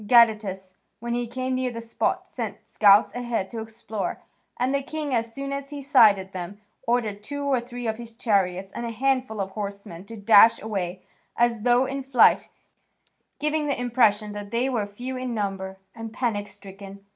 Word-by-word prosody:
Gadatas, 210 -5 +4 0.3
when 235 +1 -3
he 240 0 -1
came 255 +2 -3
near 255 0 0
the 230 -1 -6
spot, 230 0 -1
sent - - -6
scouts 205 0 +5
ahead 240 -5 -2
to 230 - -5
explore, 220 -1 -5 0.4
and 255 +2 0
the 280 - +1
king, 295 0 -4
as 230 -1 0
soon 275 +3 -5
as 275 0 -5
he 290 -1 -6
sighted 215 -9 +4
them, 185 +2 -6 0.3
ordered 225 -4 0
two 285 +6 -5
or 270 -3 +1
three 245 0 -7
of 220 0 -2
his 230 -1 -9
chariots 195 -5 0
and 240 - -5
a 235 - -3
handful 255 -1 0
of 195 -1 -2
horsemen 200 -4 -6
to 225 +2 -9
dash 210 +2 +7
away 190 -4 -4 0.3
as 235 -2 +2
though 245 +2 +4
in 275 +1 -3
flight, 260 -2 +4 0.9
giving 300 0 0
the 280 - -1
impression 225 -4 +2
that 205 0 -7
they 235 +4 0
were 230 -6 -1
few 245 +6 -6
in 255 -2 -3
number 195 -2 -3 0.2
and 225 -1 -7
panic 220 -4 -2
stricken. 195 0 -12
230 Hz, 180 wpm, -25 LUFS, 205-255 Hz, 0.9 s, dash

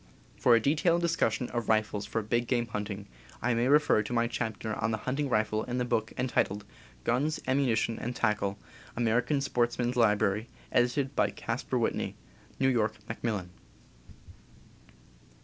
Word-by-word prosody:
* - - -28
♦For 120 - +6
a - - +5
detailed 160 +7 +2
discussion 125 -8 +1
of 120 -3 -3
rifles 110 -2 +1
for 110 +1 -2
big 120 +3 0
game 120 -1 +1
hunting 105 -2 -5 0.3
I 120 +1 +1
may 120 +2 +1
refer 145 -6 +5
to 105 +3 -5
my 115 0 +2
chapter 110 -2 -3
on 115 - +2
The 110 - 0
Hunting 140 +2 -1
Rifle 110 -2 +1
in 125 0 -3
the 125 - 0
book 110 -2 0
entitled 105 -5 0 0.4
Guns, 145 +6 +1
Ammunition, 125 -4 +1
and 120 +1 -4
Tackle 100 -3 0 0.4
(American 120 +5 +1
Sportsman's 120 -2 0
Library; 105 -2 +2 0.2
edited 130 +3 +1
by - - +3
Caspar - - -3
Whitney. - - -1 0.4
New 135 - +3
York, 110 -4 +1
Macmillan). 105 -6 -3
120 Hz, 150 wpm, -30 LUFS, 110-125 Hz, 0.4 s, ♦For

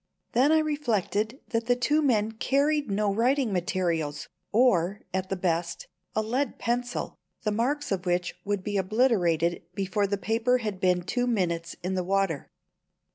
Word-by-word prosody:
Then 260 +5 +4
I 315 - +6
reflected 245 - 0
that 230 -1 -1
the 245 - +4
two 290 +5 +2
men 225 -7 +2
carried 280 +4 +1
no 200 0 +1
writing 245 +1 +2
materials, 170 -5 -1 0.2
or, 210 -5 +3
at 190 0 -2
the 195 - 0
best, 170 -2 -1 0.3
a 220 - +1
lead 250 +4 -1
pencil, 245 +1 -2 0.2
the 210 - +1
marks 260 +7 -1
of 190 -1 -1
which 175 0 0
would 205 -2 -2
be 205 0 -1
obliterated 185 -6 +2
before 200 +1 0
the 200 +1 -1
paper 230 +5 +1
had 210 -6 -4
been 180 -1 +2
two 245 +7 -1
minutes 170 -7 -1
in 185 +1 -1
the 185 -1 0
water. 195 -5 0
210 Hz, 160 wpm, -27 LUFS, 180-245 Hz, 0.3 s, I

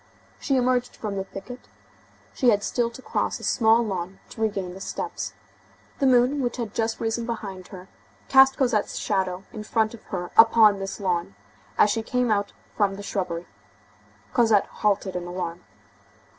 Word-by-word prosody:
She 275 - 0
emerged 250 -1 +1
from 210 -2 -4
"the 195 - -2
thicket"; 195 +6 -10 0.7
she 250 - +3
had 205 -2 +3
still 235 +2 0
to 245 +2 -12
cross - - -1
a - - -12
small 225 0 +4
lawn 190 -2 -4
to 225 - -9
regain 195 -5 -1
the 190 - -10
steps. - - -4 0.7
The 275 - +3
moon, 255 +3 +4
which 245 -1 -2
had 230 -4 -4
just 225 -1 -1
risen 230 +1 -2
behind 195 -5 -5
her, 185 -1 -11 0.4
cast 270 0 +6
Cosette's 240 -6 +1
shadow 185 -1 -1
in 215 - -6
front 220 +1 0
of 230 - -11
her 180 -2 -5
upon 225 -3 +6
this 195 +2 -5
lawn, 180 -1 -1 0.4
as 205 - +5
she 225 - 0
came 250 +1 0
out 205 -1 0 0.2
from 200 -2 +1
the 200 - -8
shrubbery. 180 -4 -3 0.9
Cosette 225 -5 +4
halted 200 -2 0
in 175 0 -4
alarm. 175 -1 -5
210 Hz, 170 wpm, -25 LUFS, 195-235 Hz, 0.9 s, cast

